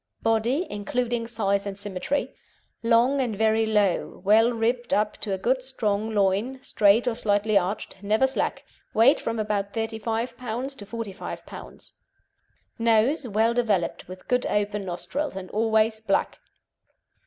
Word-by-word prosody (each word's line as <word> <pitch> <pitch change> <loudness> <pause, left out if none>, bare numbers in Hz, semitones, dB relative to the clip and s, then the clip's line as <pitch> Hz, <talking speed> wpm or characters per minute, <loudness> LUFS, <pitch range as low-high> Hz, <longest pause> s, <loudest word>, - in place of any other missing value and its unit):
BODY 225 +8 +2
(INCLUDING 230 +3 -2
SIZE 200 -3 0
AND 195 -1 -5
SYMMETRY) 200 +7 -2 0.5
Long 240 +4 +3
and 235 -5 -1
very 220 +1 +2
low, 210 -4 +1
well 225 +4 +5
ribbed 240 +1 0
up 210 0 +1
to 210 -1 0
a 190 - 0
good 255 +7 +1
strong 220 -5 -1
loin, 205 +6 +1
straight 210 +4 +3
or 245 - +2
slightly 210 -1 +1
arched, 190 0 -1
never 215 +5 +2
slack; 265 - -2 0.3
weight 230 +6 +5
from 230 0 -3
about 210 -2 -2
35 225 +1 -2
lbs. 250 +3 -4
to 205 - -10
45 225 -4 -6
lbs. - - -11 0.9
NOSE 230 +5 +2
Well 220 +2 +2
developed, 215 -8 0
with 185 +1 -11
good 250 0 +1
open 205 -1 -1
nostrils, 260 - -3
and 190 -1 -7
always 220 0 +2
black. 210 -3 -1
220 Hz, 145 wpm, -25 LUFS, 205-235 Hz, 0.9 s, well